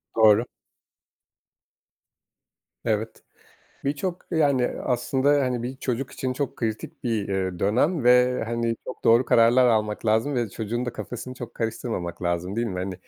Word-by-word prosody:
Doğru. 110 +1 +5 2.4
Evet. 110 0 -2 0.6
Birçok, 150 +6 -3
yani, 140 -7 +3
aslında, 130 +2 0
hani, 125 -2 -1
bir 125 +2 -4
çocuk 125 0 -3
için 130 -1 -3
çok 140 +1 -3
kritik 110 -2 -4
bir, 115 -5 -1
eee, 95 -2 -2
dönem 130 - +1
ve, 125 0 +4
hani, 115 0 -1
çok 130 - -8
doğru 115 +3 +5
kararlar 120 +2 +5
almak 110 -2 0
lazım 110 +6 +2
ve 120 -3 0
çocuğun 115 +4 -3
da 125 - -4
kafasını 125 +1 -6
çok 120 -2 -8
karıştırmamak 110 -6 -4
lazım 85 +2 -1
değil 120 +1 0
mi? 90 -4 -4
Hani, 95 +1 -3
120 Hz, 140 wpm, -25 LUFS, 110-125 Hz, 2.4 s, Doğru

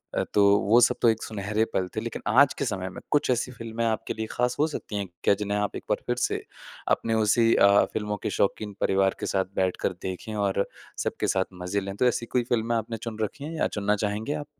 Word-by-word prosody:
अ, - - +1
तो 100 - +6 0.2
वो 110 +5 +4
सब - - +4
तो 115 - +7
एक 110 0 0
सुनहरे 105 +1 -1
पल 95 - 0
थे 110 - -1
लेकिन 115 0 -5
आज 130 +4 +5
के 140 - 0
समय 95 -5 -2
में - - -9
कुछ 145 -3 +2
ऐसी 125 +1 0
फिल्में 115 -1 -5
आपके 110 -1 -1
लिए 110 - -3
ख़ास 125 0 0
हो 155 - +4
सकती 115 -8 -6
हैं 100 -1 -2 0.2
क्या - - +5
जिन्हें 105 0 -1
आप 105 - -2
एक - - -9
बार - - +1
फिर - - +1
से - - -1 0.5
अपने 115 - -3
उसी 110 +1 +4
अ, 100 0 +6
फिल्मों 105 -1 -2
के - - 0
शौकीन 105 +1 0
परिवार 95 0 +2
के - - -3
साथ 95 -1 +1
बैठकर 95 0 0
देखें 95 +4 -5
और 100 -1 +1 0.4
सबके - - -2
साथ 95 -1 +1 0.2
मज़े 100 +3 -1
लें? 100 0 -5
तो 125 - +2
ऐसी 120 -1 0
कोई 120 +1 0
फिल्में 115 -1 +1
आपने 115 +1 -3
चुन 110 0 -7
रखे 140 +7 -3
हैं 160 - -5
या - - +2
चुनना 105 0 0
चाहेंगे 110 +8 -2
आप? 145 - -5
110 Hz, 240 wpm, -26 LUFS, 100-115 Hz, 0.5 s, तो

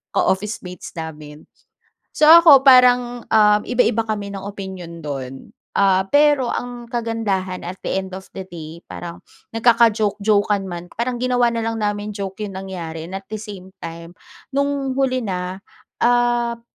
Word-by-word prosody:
ka-officemates 190 -3 -2
namin. 155 -2 -8 0.7
So, 305 - +3
ako 325 -4 +9
parang, 245 -2 +5
um, 210 -1 +4
iba-iba 240 -2 +1
kami 205 -2 -4
ng 195 - -6
opinyon 190 -4 -8
do'n. 135 -4 -5 0.4
Ah, 190 -1 +3
pero 290 -3 +4
ang 245 -1 -5
kagandahan, 225 -6 -3
at 185 +2 -7
the - - -3
end 190 -1 -4
of 190 0 -9
the 190 - -5
day, 170 -2 -10
parang 170 -1 -9 0.3
nagkaka-joke 225 -3 +3
jokekan 205 -2 +1
man, 175 0 -6
parang 245 +2 -2
ginawa 245 -1 +2
na 230 -1 -2
lang 225 0 -2
namin 205 0 -2
joke 200 0 -5
yung 200 - -6
nangyari 170 -4 -6
and 190 - -5
at 195 - -8
the 215 - -4
same 195 -4 -10
time, 170 0 -8 0.4
nung 280 -1 -1
huli 255 -2 0
na, 185 -1 -4 0.4
um, 240 -1 +2
205 Hz, 150 wpm, -20 LUFS, 185-240 Hz, 0.7 s, ako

